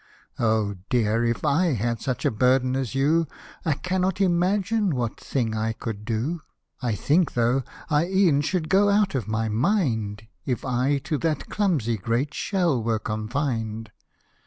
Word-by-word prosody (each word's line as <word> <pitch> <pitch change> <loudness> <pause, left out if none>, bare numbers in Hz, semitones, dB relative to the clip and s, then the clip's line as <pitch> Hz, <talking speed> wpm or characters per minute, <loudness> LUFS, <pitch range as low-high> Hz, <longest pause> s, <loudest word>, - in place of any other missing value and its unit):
" - - -48
O 110 -3 +1 0.2
dear! 115 -3 +2
if 115 +5 -1
I 155 +3 +3
had 115 0 -1
such 130 -2 -2
a - - +3
burden 130 +3 +2
as 135 -2 -2
you, 155 +4 +2 0.4
I 160 - +2
cannot 185 +4 -1
imagine 195 +1 +2
what 120 -3 -2
thing 115 -5 -2
I 110 +1 -1
could 110 -2 -6
do: 120 +9 -2 0.4
I 120 -4 0
think, 160 - +2
though, 120 +3 +2 0.3
I 150 +2 +2
e'en 185 -6 +3
should 160 +2 -1
go 200 +3 +4
out 200 -1 +3
of 125 -7 -2
my 110 +1 -1
mind, 110 - 0 0.2
If 125 -3 -2
I 130 +3 +1
to 155 -2 -2
that 155 -3 -1
clumsy 150 - 0
great 115 +9 -1
shell 175 - 0
were 110 0 0
confined." 110 0 -3
130 Hz, 160 wpm, -25 LUFS, 115-170 Hz, 0.4 s, go